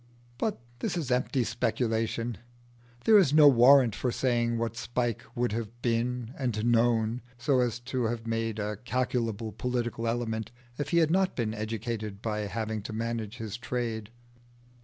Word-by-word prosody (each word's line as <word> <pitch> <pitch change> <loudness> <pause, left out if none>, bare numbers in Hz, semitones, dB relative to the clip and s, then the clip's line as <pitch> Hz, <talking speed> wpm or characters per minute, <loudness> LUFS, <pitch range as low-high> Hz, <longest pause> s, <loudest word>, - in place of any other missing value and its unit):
But 220 -3 -1 0.2
this 175 - -2
is 150 -7 -2
empty 125 +1 +1
speculation: 115 -1 -1 0.7
there 220 -2 +8
is 165 -8 +3
no 150 -1 +8
warrant 130 -2 +7
for 125 - -1
saying 120 -2 +1
what 115 0 -2
Spike 120 -1 -2
would 120 -1 0
have 115 +1 -4
been 120 0 -1
and 115 -5 -1
known 115 0 +2 0.2
so 130 +2 +2
as 120 -2 +1
to 125 0 -2
have 115 0 -2
made 115 -1 -1
a 105 0 -3
calculable 120 -3 -1
political 120 +1 -2
element, 115 -2 -2 0.3
if 145 - -2
he 170 - +2
had 160 -2 +4
not 190 +1 +2
been 110 -3 -1
educated 110 -1 -4
by 105 -1 -2
having 110 0 -3
to 105 - -7
manage 115 0 -3
his 110 -2 -5
trade. 120 -3 -3
115 Hz, 160 wpm, -29 LUFS, 110-125 Hz, 0.7 s, there